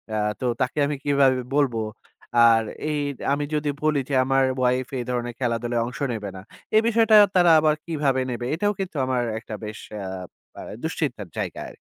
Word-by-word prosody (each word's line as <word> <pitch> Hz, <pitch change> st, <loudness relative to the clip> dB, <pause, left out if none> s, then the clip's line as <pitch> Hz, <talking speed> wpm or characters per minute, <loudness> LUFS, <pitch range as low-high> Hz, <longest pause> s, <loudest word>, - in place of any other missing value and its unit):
আ -, -, 0 dB, 0.2 s
তো -, -, -1 dB, 0.2 s
তাকে 130 Hz, +4 st, 0 dB
আমি 150 Hz, -, -2 dB
কিভাবে 140 Hz, -2 st, +4 dB, 0.2 s
বলবো? 125 Hz, -6 st, +2 dB, 0.7 s
আর 115 Hz, -1 st, +5 dB, 0.3 s
এই 150 Hz, -1 st, -1 dB, 0.3 s
আমি 145 Hz, +1 st, -1 dB
যদি 150 Hz, 0 st, 0 dB
বলি 155 Hz, -2 st, +2 dB
যে 140 Hz, -, 0 dB
আমার 135 Hz, 0 st, +3 dB, 0.2 s
ওয়াইফ 125 Hz, 0 st, +1 dB
এই -, -, -2 dB
ধরনের 120 Hz, -1 st, -2 dB
খেলাধুলায় 120 Hz, -1 st, -1 dB
অংশ 125 Hz, -, -7 dB
নেবে 105 Hz, -3 st, -5 dB
না। -, -, -8 dB, 0.3 s
এই 220 Hz, -, +7 dB
বিষয়টা 225 Hz, -1 st, +4 dB, 0.2 s
তারা 175 Hz, -2 st, +6 dB
আবার 155 Hz, -1 st, +3 dB
কিভাবে 145 Hz, -5 st, 0 dB
নেবে? 120 Hz, 0 st, -4 dB
এটাও 205 Hz, +4 st, 0 dB
কিন্তু 190 Hz, -3 st, -4 dB
আমার 125 Hz, -2 st, 0 dB, 0.2 s
একটা 110 Hz, -1 st, -8 dB
বেশ 105 Hz, 0 st, -7 dB, 0.3 s
আব 95 Hz, -1 st, -7 dB, 0.3 s
আ -, -, -6 dB, 0.2 s
দুশ্চিন্তার -, -, -3 dB
জায়গা -, -, -3 dB
আরকি। -, -, -15 dB
130 Hz, 180 wpm, -24 LUFS, 120-150 Hz, 0.7 s, এই